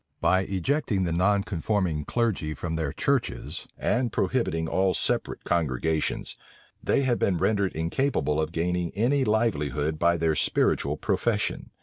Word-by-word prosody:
By 95 Hz, +3 st, +3 dB
ejecting 100 Hz, -, 0 dB
the 85 Hz, -, -1 dB
nonconforming 95 Hz, -3 st, 0 dB
clergy 105 Hz, -10 st, -1 dB
from 80 Hz, +4 st, -4 dB
their 80 Hz, -3 st, -1 dB
churches, -, -, -2 dB
and 120 Hz, -1 st, 0 dB
prohibiting 80 Hz, -13 st, 0 dB
all 95 Hz, +1 st, +1 dB
separate -, -, -1 dB
congregations, 80 Hz, -1 st, -1 dB, 0.5 s
they -, -, +2 dB
had 125 Hz, -3 st, +1 dB
been 95 Hz, -3 st, +2 dB
rendered 100 Hz, +1 st, +1 dB
incapable 80 Hz, -, 0 dB
of 80 Hz, +1 st, -2 dB
gaining 90 Hz, +1 st, -1 dB
any 130 Hz, +7 st, +2 dB
livelihood 80 Hz, -, 0 dB
by 85 Hz, 0 st, +3 dB
their 80 Hz, -1 st, +1 dB
spiritual 75 Hz, -1 st, +1 dB
profession. 105 Hz, +2 st, -1 dB
90 Hz, 130 wpm, -26 LUFS, 80-105 Hz, 0.5 s, By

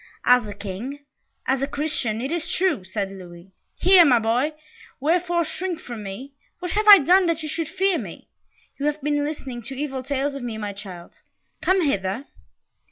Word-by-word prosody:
"As 250 Hz, -3 st, +5 dB
a 205 Hz, -, -7 dB
King 230 Hz, +9 st, -7 dB, 0.4 s
as 265 Hz, 0 st, +1 dB
a 275 Hz, -, 0 dB
Christian, 280 Hz, -7 st, -2 dB
it 265 Hz, +4 st, -3 dB
is 330 Hz, -1 st, -2 dB
true!" 350 Hz, -, +1 dB
said 195 Hz, +1 st, -4 dB
Louis. 180 Hz, -1 st, -12 dB, 0.2 s
"Here, 370 Hz, -1 st, +7 dB
my 265 Hz, -6 st, +5 dB
boy! 240 Hz, +7 st, +1 dB, 0.5 s
Wherefore 340 Hz, +4 st, +1 dB
shrink 345 Hz, +2 st, -4 dB
from 240 Hz, -6 st, -8 dB
me? 210 Hz, +8 st, -8 dB, 0.2 s
What 360 Hz, -1 st, -5 dB
have 425 Hz, +3 st, 0 dB
I 410 Hz, -1 st, +12 dB
done, 360 Hz, +3 st, +4 dB
that 330 Hz, -1 st, 0 dB
you -, -, -3 dB
should 320 Hz, 0 st, -3 dB
fear 375 Hz, +1 st, +1 dB
me? -, -, -9 dB, 0.5 s
You 285 Hz, -, 0 dB
have 300 Hz, +1 st, -1 dB
been 290 Hz, 0 st, +1 dB
listening 275 Hz, -5 st, -5 dB
to 235 Hz, +4 st, -8 dB
evil 270 Hz, -1 st, -3 dB
tales 280 Hz, +1 st, -2 dB
of 275 Hz, -, -6 dB
me, 235 Hz, -3 st, -4 dB
my 205 Hz, -2 st, -4 dB
child. 190 Hz, -4 st, -11 dB, 0.4 s
Come 375 Hz, 0 st, +3 dB
hither." 200 Hz, -2 st, -1 dB
275 Hz, 185 wpm, -23 LUFS, 220-330 Hz, 0.5 s, I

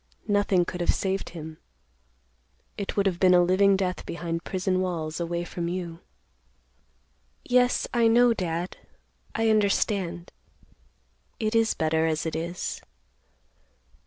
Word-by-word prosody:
Nothing 205 Hz, -4 st, +2 dB
could 180 Hz, 0 st, -5 dB
have 175 Hz, -, +3 dB
saved 195 Hz, 0 st, -2 dB
him. 160 Hz, -2 st, -9 dB, 1.2 s
It 200 Hz, 0 st, -5 dB
would 200 Hz, -, +3 dB
have 180 Hz, -3 st, 0 dB
been 185 Hz, -1 st, +5 dB
a 175 Hz, -, +6 dB
living 190 Hz, +2 st, +4 dB
death 185 Hz, -1 st, -2 dB
behind 170 Hz, -1 st, -4 dB
prison 185 Hz, 0 st, -1 dB
walls 165 Hz, -4 st, -3 dB
away 170 Hz, 0 st, -2 dB
from 175 Hz, 0 st, -4 dB
you." 170 Hz, -2 st, -4 dB, 1.5 s
"Yes, 250 Hz, 0 st, +3 dB
I 235 Hz, -2 st, +4 dB
know, 240 Hz, +1 st, +5 dB
Dad. 175 Hz, -3 st, -3 dB, 0.6 s
I 225 Hz, 0 st, +2 dB
understand. 195 Hz, -4 st, 0 dB, 1.1 s
It 215 Hz, -1 st, -1 dB
is 225 Hz, -1 st, +2 dB
better 160 Hz, 0 st, +1 dB
as 160 Hz, 0 st, -1 dB
it 160 Hz, -, -2 dB
is. 170 Hz, +2 st, -4 dB
180 Hz, 130 wpm, -26 LUFS, 170-200 Hz, 1.5 s, a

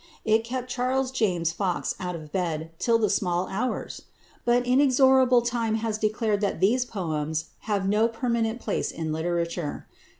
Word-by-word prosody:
It 220 Hz, +1 st, +3 dB
kept 250 Hz, +2 st, -4 dB
Charles 255 Hz, +1 st, 0 dB
James 180 Hz, -10 st, +1 dB
Fox 180 Hz, +1 st, -1 dB
out 180 Hz, -1 st, -3 dB
of 155 Hz, -2 st, -9 dB
bed 165 Hz, -3 st, -2 dB
till 230 Hz, -1 st, +3 dB
the 220 Hz, -2 st, +2 dB
small 180 Hz, -2 st, 0 dB
hours! 225 Hz, +6 st, -3 dB, 0.4 s
But 245 Hz, +1 st, +3 dB
inexorable 260 Hz, -1 st, +5 dB
time 235 Hz, -2 st, 0 dB
has 220 Hz, -1 st, -2 dB
declared 215 Hz, -1 st, 0 dB
that 200 Hz, -, -1 dB
these 245 Hz, +7 st, +3 dB
poems 160 Hz, -6 st, -3 dB, 0.2 s
have 200 Hz, -2 st, +1 dB
no 210 Hz, +3 st, +3 dB
permanent 235 Hz, 0 st, -1 dB
place -, -, -2 dB
in 160 Hz, -1 st, -4 dB
literature. 170 Hz, -1 st, -2 dB
215 Hz, 155 wpm, -26 LUFS, 175-245 Hz, 0.4 s, inexorable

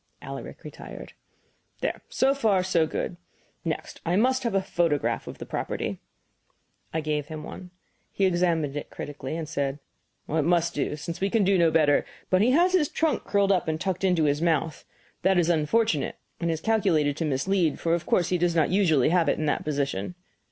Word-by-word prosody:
Alaric -, -, -8 dB
retired. -, -, -10 dB, 0.7 s
"There -, -, -2 dB
so 270 Hz, +1 st, +2 dB
far, 215 Hz, -9 st, +2 dB
so 170 Hz, -4 st, +2 dB
good. 175 Hz, -, -3 dB, 0.5 s
Next, 160 Hz, -2 st, -4 dB
I 170 Hz, +2 st, 0 dB
must 260 Hz, +5 st, +3 dB
have 235 Hz, -5 st, -1 dB
a 195 Hz, -, +3 dB
photograph 165 Hz, -6 st, 0 dB
of -, -, -7 dB
the -, -, -7 dB
property." -, -, -3 dB, 0.9 s
I 160 Hz, -, -1 dB
gave 150 Hz, -1 st, -2 dB
him 155 Hz, 0 st, -7 dB
one. 180 Hz, -, -9 dB, 0.4 s
He 195 Hz, -, +1 dB
examined 170 Hz, -5 st, +1 dB
it 145 Hz, -, -5 dB
critically, 145 Hz, +1 st, -6 dB
and 160 Hz, -2 st, -4 dB
said: 140 Hz, -2 st, -2 dB, 0.5 s
"It 160 Hz, +1 st, +1 dB
must 170 Hz, +2 st, +2 dB
do, 145 Hz, +1 st, -1 dB
since 165 Hz, +4 st, -6 dB
we 195 Hz, -, +1 dB
can 220 Hz, 0 st, +2 dB
do 195 Hz, +1 st, +3 dB
no 170 Hz, -3 st, +4 dB
better; 155 Hz, -3 st, +3 dB, 0.3 s
but 185 Hz, 0 st, +4 dB
he 230 Hz, -, +4 dB
has 345 Hz, +7 st, +4 dB
his 315 Hz, -6 st, +3 dB
trunk 315 Hz, -6 st, 0 dB
curled 200 Hz, -1 st, +2 dB
up 185 Hz, -4 st, +1 dB
and 155 Hz, 0 st, -1 dB
tucked 190 Hz, +1 st, -2 dB
into 180 Hz, -4 st, +3 dB
his 145 Hz, 0 st, +1 dB
mouth. 160 Hz, -2 st, 0 dB, 0.4 s
That 190 Hz, 0 st, +3 dB
is 175 Hz, -1 st, +3 dB
unfortunate, 165 Hz, +1 st, +1 dB, 0.2 s
and 170 Hz, -, -1 dB
is 160 Hz, -1 st, -1 dB
calculated 170 Hz, -10 st, +2 dB
to 165 Hz, -, -1 dB
mislead, 155 Hz, +3 st, +1 dB
for 165 Hz, -, +1 dB
of 170 Hz, -1 st, -1 dB
course 175 Hz, -, +2 dB
he 180 Hz, -, +1 dB
does 175 Hz, 0 st, +1 dB
not 160 Hz, 0 st, +2 dB
usually 165 Hz, -9 st, +3 dB
have 170 Hz, -3 st, +3 dB
it -, -, +1 dB
in 155 Hz, -, -2 dB
that 145 Hz, -, 0 dB
position." 140 Hz, -, -2 dB
170 Hz, 195 wpm, -26 LUFS, 155-190 Hz, 0.9 s, no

